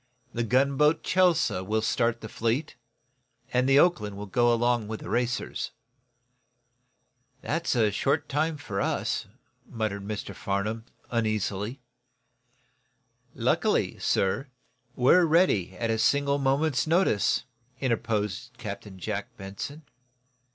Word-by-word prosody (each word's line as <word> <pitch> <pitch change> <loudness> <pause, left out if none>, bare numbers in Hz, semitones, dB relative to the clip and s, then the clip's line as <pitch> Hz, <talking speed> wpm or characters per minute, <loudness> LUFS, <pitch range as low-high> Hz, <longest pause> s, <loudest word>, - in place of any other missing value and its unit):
The 120 - -1
gunboat, 140 +6 +3
'Chelsea' 180 - +2
will 110 +3 -1
start 115 +1 +1
the 110 - -6
fleet, 115 +7 -1 0.8
and 125 +1 +2
the 135 - +6
'Oakland' 105 - +3
will 105 - -5
go 120 +5 +2
along 120 -1 +1
with 110 0 -5
the - - -7
racers." 120 0 -1 1.7
"That's 160 -3 -1 0.2
short 140 +7 0
time 155 +2 0
for 105 -8 -4
us," - - -1 0.4
muttered 110 -3 -2
Mr. 105 0 -5
Farnum, 105 +3 -2 0.3
uneasily. 110 +1 -1 1.5
"Luckily, - - +1
sir, 100 +9 +1 0.5
we're 135 +8 +5
ready, 155 - +2
at 115 +2 -1
a 110 - 0
single 140 +4 +2
moment's 140 +1 +1
notice," 165 - +2 0.4
interposed 115 -2 -2
Captain 100 -4 -7
Jack 90 - -5
Benson. 120 +11 -7
120 Hz, 110 wpm, -27 LUFS, 105-140 Hz, 1.7 s, the